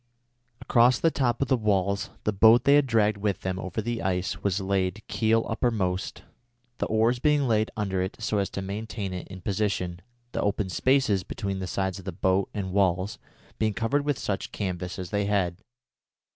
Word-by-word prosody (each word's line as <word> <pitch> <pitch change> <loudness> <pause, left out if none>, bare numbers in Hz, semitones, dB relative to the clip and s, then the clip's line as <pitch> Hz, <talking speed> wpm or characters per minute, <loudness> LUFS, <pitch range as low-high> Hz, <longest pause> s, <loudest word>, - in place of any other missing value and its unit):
Across 125 0 +4
the 165 - +4
top 130 -2 +1
of - - -4
the 130 - +3
walls 100 -3 0
the 105 - 0
boat 115 +4 +6
they 140 - +5
had 145 -1 +5
dragged 110 -3 +2
with 100 -2 -1
them 95 0 -2
over 95 +4 -4
the 120 0 -2
ice 95 -1 -1
was 100 -1 0
laid 95 +1 -1
keel 115 0 +2
uppermost, 105 -6 -1 0.6
the - - 0
oars 115 +3 +2
being 150 -1 +2
laid 110 -1 +2
under 95 -3 -1
it 95 +1 -3
so 110 -2 0
as 100 - 0
to 95 - -5
maintain 100 0 -4
it 90 - -6
in 95 -1 -10
position, 95 -3 -1 0.3
the - - -2
open 100 -1 0
spaces 130 -1 +2
between 100 0 -4
the 95 - -4
sides 95 0 -2
of 95 - -12
the 95 - -3
boat 95 +2 +1
and 100 -3 -4
the - - -7
walls 95 0 +1 0.4
being 110 -2 +1
covered 135 +5 0
with 145 -3 0
such 100 - -3
canvas 90 -3 -4
as 90 -2 -6
they 100 -1 0
had. 95 -4 0
100 Hz, 195 wpm, -27 LUFS, 95-115 Hz, 0.6 s, boat